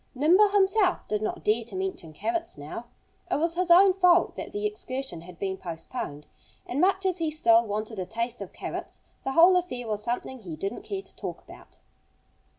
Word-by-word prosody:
Nimble 350 Hz, +10 st, +5 dB
himself 390 Hz, -1 st, +2 dB
did 210 Hz, 0 st, -1 dB
not 215 Hz, -, -3 dB
dare 220 Hz, +2 st, +2 dB
to 235 Hz, -, -10 dB
mention 375 Hz, -, -4 dB
carrots 340 Hz, -, -3 dB
now. 150 Hz, +11 st, -7 dB, 0.4 s
It -, -, +1 dB
was 330 Hz, +2 st, +1 dB
his 360 Hz, +1 st, 0 dB
own 370 Hz, +2 st, +8 dB
fault 360 Hz, -2 st, +4 dB
that -, -, -7 dB
the 415 Hz, 0 st, -3 dB
excursion 265 Hz, -, -4 dB
had 175 Hz, 0 st, -12 dB
been 190 Hz, 0 st, -3 dB
postponed. 165 Hz, -, -6 dB, 0.4 s
And 265 Hz, +5 st, -2 dB
much 385 Hz, +1 st, +2 dB
as 370 Hz, -1 st, +1 dB
he 325 Hz, -1 st, 0 dB
still 235 Hz, -7 st, +4 dB
wanted 215 Hz, 0 st, -4 dB
a 185 Hz, -, -2 dB
taste 235 Hz, +1 st, -3 dB
of -, -, -7 dB
carrots -, -, -6 dB, 0.2 s
the 270 Hz, -, -2 dB
whole 345 Hz, +4 st, +7 dB
affair 250 Hz, -10 st, -3 dB
was 210 Hz, -1 st, -2 dB
something 245 Hz, +3 st, -3 dB
he 175 Hz, -8 st, -7 dB
didn't 195 Hz, +8 st, -4 dB
care 390 Hz, -1 st, -5 dB
to -, -, -16 dB
talk -, -, -6 dB
about. -, -, -16 dB
265 Hz, 195 wpm, -27 LUFS, -, 0.4 s, own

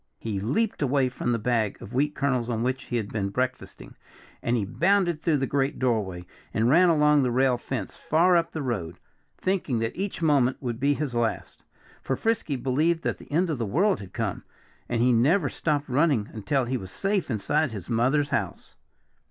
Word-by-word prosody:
He 105 Hz, -3 st, -3 dB
leaped 200 Hz, -, -1 dB
away 135 Hz, -2 st, +2 dB
from 125 Hz, -1 st, -2 dB
the 120 Hz, -, +1 dB
bag 110 Hz, -2 st, 0 dB
of 105 Hz, -, -10 dB
wheat 145 Hz, +4 st, +1 dB
kernels 130 Hz, -4 st, 0 dB
on 115 Hz, -1 st, -1 dB
which 130 Hz, +1 st, -2 dB
he 120 Hz, -, -4 dB
had 105 Hz, -3 st, -4 dB
been 100 Hz, -3 st, -1 dB
breakfasting 130 Hz, +5 st, -4 dB, 0.5 s
and 120 Hz, +1 st, +1 dB
he 105 Hz, -, -1 dB
bounded 175 Hz, -, +1 dB
through 160 Hz, -3 st, +2 dB
the 135 Hz, -, 0 dB
great 135 Hz, 0 st, 0 dB
doorway 105 Hz, -8 st, -1 dB, 0.3 s
and 110 Hz, +1 st, +2 dB
ran 175 Hz, +4 st, +6 dB
along 150 Hz, -2 st, +4 dB
the 130 Hz, -, +1 dB
rail 130 Hz, +1 st, +3 dB
fence, 120 Hz, -4 st, -5 dB
far 175 Hz, +4 st, +3 dB
up 170 Hz, -1 st, +1 dB
the 155 Hz, -, -4 dB
road, 95 Hz, -9 st, -3 dB, 0.4 s
thinking 185 Hz, -10 st, -1 dB
that 115 Hz, 0 st, -2 dB
each 195 Hz, +2 st, -3 dB
moment 140 Hz, -5 st, +3 dB
would 120 Hz, -3 st, -4 dB
be 140 Hz, +2 st, +2 dB
his 140 Hz, -4 st, -3 dB
last. 120 Hz, -1 st, -2 dB, 0.4 s
For 135 Hz, -, -1 dB
Frisky 225 Hz, -9 st, -1 dB
believed 155 Hz, +6 st, 0 dB
that -, -, -2 dB
the -, -, -14 dB
end 170 Hz, +3 st, +1 dB
of 145 Hz, -, -3 dB
the 115 Hz, -, -1 dB
world 190 Hz, -, +2 dB
had 95 Hz, -2 st, -10 dB
come. 110 Hz, -4 st, -3 dB, 0.5 s
And 120 Hz, -1 st, +1 dB
he 125 Hz, 0 st, +4 dB
never 145 Hz, -, +3 dB
stopped 150 Hz, -2 st, -1 dB
running 135 Hz, -5 st, +2 dB
until 120 Hz, +5 st, 0 dB
he 130 Hz, +2 st, -1 dB
was 95 Hz, -5 st, -8 dB
safe 195 Hz, -, -1 dB
inside 145 Hz, +7 st, 0 dB
his 100 Hz, -5 st, -7 dB
mother's 130 Hz, +5 st, +1 dB
house. 105 Hz, -11 st, -3 dB
130 Hz, 200 wpm, -26 LUFS, 115-150 Hz, 0.5 s, ran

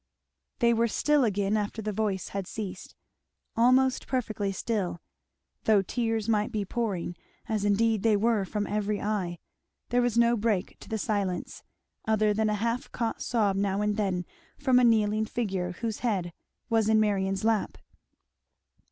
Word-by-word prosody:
They 235 Hz, -2 st, +4 dB
were 230 Hz, +1 st, +2 dB
still 295 Hz, +5 st, +2 dB
again 205 Hz, -2 st, +1 dB
after 210 Hz, +1 st, -2 dB
the 215 Hz, -1 st, -2 dB
voice 200 Hz, -2 st, -1 dB
had 195 Hz, -2 st, -4 dB
ceased; 195 Hz, -4 st, -7 dB, 0.6 s
almost 255 Hz, +3 st, +3 dB
perfectly 215 Hz, -6 st, -1 dB
still; 195 Hz, -4 st, -2 dB, 0.7 s
though 210 Hz, -3 st, +4 dB
tears 225 Hz, +1 st, -1 dB
might 210 Hz, -2 st, +1 dB
be 210 Hz, -2 st, -2 dB
pouring, 195 Hz, -6 st, -2 dB, 0.3 s
as 215 Hz, -2 st, -1 dB
indeed 215 Hz, +1 st, +2 dB
they 220 Hz, -1 st, +3 dB
were 220 Hz, -1 st, +2 dB
from 205 Hz, +2 st, -2 dB
every 210 Hz, 0 st, -1 dB
eye, 195 Hz, -5 st, -2 dB, 0.5 s
there 245 Hz, +1 st, +3 dB
was 240 Hz, -2 st, 0 dB
no 235 Hz, 0 st, +5 dB
break 210 Hz, -4 st, -1 dB
to -, -, -13 dB
the 220 Hz, -, -1 dB
silence, 200 Hz, -4 st, -2 dB, 0.5 s
other 215 Hz, -1 st, +3 dB
than 215 Hz, +1 st, +1 dB
a 210 Hz, -, +1 dB
half 235 Hz, +5 st, -2 dB
caught 230 Hz, -2 st, -2 dB
sob 210 Hz, -5 st, +1 dB
now 200 Hz, +1 st, 0 dB
and 210 Hz, 0 st, +1 dB
then 190 Hz, -4 st, -1 dB, 0.3 s
from 260 Hz, -3 st, +4 dB
a -, -, +3 dB
kneeling 215 Hz, -2 st, +3 dB
figure 195 Hz, -6 st, -2 dB
whose 225 Hz, -2 st, -2 dB
head 190 Hz, -8 st, -1 dB, 0.3 s
was 225 Hz, -2 st, +2 dB
in 220 Hz, 0 st, +5 dB
Marion's 195 Hz, -2 st, +1 dB
lap. 220 Hz, -1 st, +1 dB
215 Hz, 160 wpm, -28 LUFS, 200-230 Hz, 0.7 s, no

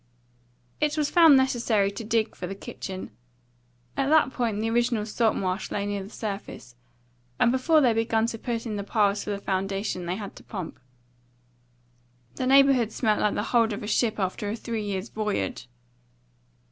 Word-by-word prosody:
It 300 Hz, 0 st, 0 dB
was 300 Hz, -1 st, 0 dB
found 325 Hz, -5 st, +7 dB
necessary 235 Hz, -6 st, +2 dB
to 200 Hz, +3 st, -7 dB
dig 225 Hz, 0 st, 0 dB
for 180 Hz, -, -5 dB
the 195 Hz, -, -5 dB
kitchen; 190 Hz, -3 st, -7 dB, 0.8 s
at 275 Hz, -, 0 dB
that 310 Hz, -4 st, +4 dB
point 230 Hz, -4 st, -1 dB
the 220 Hz, -, -1 dB
original 235 Hz, -2 st, +1 dB
salt 220 Hz, +1 st, +1 dB
marsh 185 Hz, +1 st, -2 dB
lay 200 Hz, -, -2 dB
near 205 Hz, -1 st, -2 dB
the 195 Hz, -, -9 dB
surface, 200 Hz, -, -6 dB, 0.6 s
and 240 Hz, -, +4 dB
before 300 Hz, +5 st, +3 dB
they 245 Hz, -4 st, +4 dB
began 225 Hz, 0 st, +1 dB
to 230 Hz, -1 st, -4 dB
put 235 Hz, 0 st, -3 dB
in 215 Hz, -3 st, -3 dB
the 200 Hz, -, -3 dB
piles 205 Hz, -1 st, +1 dB
for -, -, -6 dB
the 205 Hz, -, -1 dB
foundation 195 Hz, -1 st, -2 dB
they 180 Hz, -, -1 dB
had 205 Hz, -1 st, -7 dB
to -, -, -13 dB
pump. 185 Hz, -7 st, -7 dB, 1.6 s
The 255 Hz, -, -1 dB
neighbourhood 270 Hz, -4 st, +5 dB
smelt 215 Hz, -2 st, +1 dB
like 210 Hz, -, +1 dB
the 205 Hz, -, -1 dB
hold 230 Hz, -2 st, +4 dB
of 205 Hz, +3 st, -6 dB
a -, -, -5 dB
ship 220 Hz, 0 st, +1 dB
after 200 Hz, +2 st, -2 dB
a 210 Hz, -, -2 dB
three 230 Hz, -1 st, -4 dB
years' 200 Hz, +1 st, -3 dB
voyage. 205 Hz, -, -3 dB
220 Hz, 180 wpm, -26 LUFS, 200-240 Hz, 1.6 s, found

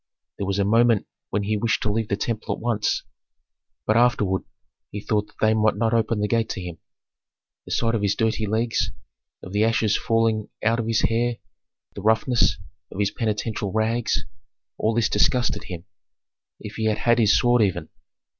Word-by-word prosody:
There 100 Hz, -, -2 dB
was 100 Hz, 0 st, -1 dB
a 100 Hz, -, +2 dB
moment 115 Hz, 0 st, +3 dB, 0.2 s
when 105 Hz, +1 st, -1 dB
he 105 Hz, +1 st, 0 dB
wished 115 Hz, +2 st, 0 dB
to 105 Hz, -, +1 dB
leave 110 Hz, +1 st, -1 dB
the 100 Hz, -, 0 dB
temple 110 Hz, +1 st, -2 dB
at -, -, -13 dB
once; 115 Hz, -3 st, 0 dB, 0.8 s
but 110 Hz, -, +2 dB
afterward 110 Hz, -6 st, +2 dB, 0.5 s
he 105 Hz, -, -6 dB
thought 105 Hz, 0 st, -1 dB
that -, -, -24 dB
they 110 Hz, 0 st, +3 dB
might 110 Hz, 0 st, +2 dB
not 115 Hz, +2 st, 0 dB
open 115 Hz, -1 st, +1 dB
the 105 Hz, -, +1 dB
gate 115 Hz, +1 st, 0 dB
to -, -, -4 dB
him. 90 Hz, -2 st, -7 dB, 0.9 s
The -, -, -10 dB
sight 115 Hz, 0 st, +1 dB
of 115 Hz, -, 0 dB
his 100 Hz, -1 st, +1 dB
dirty 110 Hz, -1 st, 0 dB
legs, 115 Hz, +2 st, 0 dB, 0.5 s
of 90 Hz, -, -9 dB
the 105 Hz, +1 st, +2 dB
ashes 110 Hz, -2 st, +2 dB
falling 115 Hz, -2 st, +1 dB
out 115 Hz, +1 st, +2 dB
of 115 Hz, -, -2 dB
his 115 Hz, -2 st, +2 dB
hair, 120 Hz, +1 st, +1 dB, 0.6 s
the 100 Hz, -, -7 dB
roughness 110 Hz, +4 st, +2 dB, 0.3 s
of -, -, -9 dB
his 100 Hz, -1 st, +1 dB
penitential 105 Hz, -2 st, -2 dB
rags, 110 Hz, +2 st, 0 dB, 0.5 s
all 110 Hz, +1 st, 0 dB
this 115 Hz, -2 st, +3 dB
disgusted 125 Hz, 0 st, +1 dB
him. 90 Hz, -3 st, -7 dB, 0.7 s
If 105 Hz, -, -9 dB
he 110 Hz, -, -1 dB
had 110 Hz, -1 st, +1 dB
had 120 Hz, +1 st, +2 dB
his 105 Hz, -3 st, +5 dB
sword 120 Hz, -1 st, +3 dB
even! 100 Hz, -4 st, 0 dB
110 Hz, 185 wpm, -24 LUFS, 105-115 Hz, 0.9 s, his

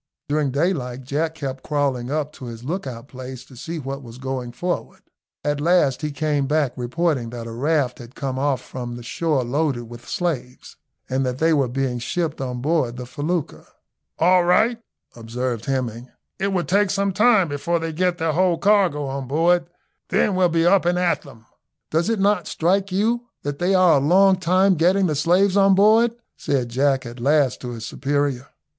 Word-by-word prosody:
During 145 Hz, -1 st, +1 dB
daylight 135 Hz, -4 st, -1 dB
Jack 155 Hz, +5 st, -2 dB
kept 135 Hz, -3 st, -5 dB
crawling 140 Hz, -5 st, -1 dB
up 150 Hz, 0 st, -2 dB
to 130 Hz, -, -10 dB
his 115 Hz, -1 st, -8 dB
lookout 135 Hz, -6 st, -5 dB
place 130 Hz, -1 st, -9 dB
to 130 Hz, -, -16 dB
see 165 Hz, +7 st, -6 dB
what 135 Hz, -1 st, -5 dB
was 120 Hz, -2 st, -11 dB
going 130 Hz, -2 st, -4 dB
forward. 175 Hz, +8 st, -4 dB, 0.4 s
At 145 Hz, 0 st, -1 dB
last 160 Hz, -5 st, +3 dB
he 150 Hz, -, -2 dB
came 145 Hz, -1 st, -1 dB
back 145 Hz, -3 st, +1 dB
reporting 130 Hz, 0 st, -1 dB
that 120 Hz, -1 st, -7 dB
a 115 Hz, -, -7 dB
raft 135 Hz, +1 st, 0 dB
had 120 Hz, +2 st, -12 dB
come 130 Hz, -2 st, -3 dB
off 140 Hz, -1 st, 0 dB
from 120 Hz, -2 st, -7 dB
the 120 Hz, -, -9 dB
shore 150 Hz, +1 st, 0 dB
loaded 135 Hz, 0 st, -1 dB
with 120 Hz, +1 st, -12 dB
slaves, 150 Hz, -9 st, -3 dB, 0.3 s
and 130 Hz, +1 st, 0 dB
that 125 Hz, -1 st, -2 dB
they 160 Hz, +3 st, +3 dB
were 140 Hz, -4 st, +2 dB
being 125 Hz, 0 st, -2 dB
shipped 155 Hz, +4 st, -2 dB
on 125 Hz, -2 st, -4 dB
board 140 Hz, -6 st, 0 dB
the 125 Hz, -, -6 dB
felucca. 155 Hz, +5 st, -3 dB, 0.5 s
"All 180 Hz, +2 st, +4 dB
right," 220 Hz, +7 st, +3 dB, 0.4 s
observed 120 Hz, 0 st, -4 dB
Hemming, 125 Hz, -2 st, -3 dB, 0.3 s
"it 195 Hz, -, 0 dB
will 190 Hz, -3 st, 0 dB
take 200 Hz, +2 st, +2 dB
some 200 Hz, 0 st, 0 dB
time 210 Hz, -2 st, +4 dB
before 155 Hz, +4 st, -1 dB
they 165 Hz, -1 st, -4 dB
get 180 Hz, +2 st, 0 dB
their 160 Hz, -1 st, 0 dB
whole 180 Hz, 0 st, +2 dB
cargo 190 Hz, -8 st, +2 dB
on 135 Hz, -1 st, -4 dB
board, 170 Hz, +4 st, +2 dB, 0.4 s
then 205 Hz, -, +2 dB
we'll 185 Hz, -1 st, +3 dB
be 165 Hz, 0 st, +1 dB
up 190 Hz, +2 st, +5 dB
and 175 Hz, +1 st, +1 dB
at 180 Hz, -1 st, +1 dB
them." 115 Hz, -5 st, -15 dB, 0.5 s
"Does 165 Hz, +6 st, +1 dB
it 225 Hz, -2 st, 0 dB
not 200 Hz, -2 st, +2 dB
strike 190 Hz, +4 st, 0 dB
you 230 Hz, +5 st, 0 dB, 0.2 s
that 145 Hz, 0 st, -4 dB
they 185 Hz, +2 st, +2 dB
are 180 Hz, -5 st, +5 dB
a 135 Hz, -, 0 dB
long 190 Hz, +5 st, +5 dB
time 185 Hz, +2 st, +3 dB
getting 185 Hz, +4 st, +3 dB
the 160 Hz, -, +1 dB
slaves 180 Hz, +6 st, +2 dB
on 195 Hz, -1 st, +5 dB
board?" 220 Hz, +4 st, +4 dB, 0.2 s
said 135 Hz, -5 st, -1 dB
Jack 135 Hz, +1 st, +1 dB
at 120 Hz, +1 st, -8 dB
last 140 Hz, +1 st, +2 dB
to 125 Hz, -, -5 dB
his 115 Hz, -1 st, -7 dB
superior. 140 Hz, -2 st, -1 dB
145 Hz, 190 wpm, -22 LUFS, 130-180 Hz, 0.5 s, up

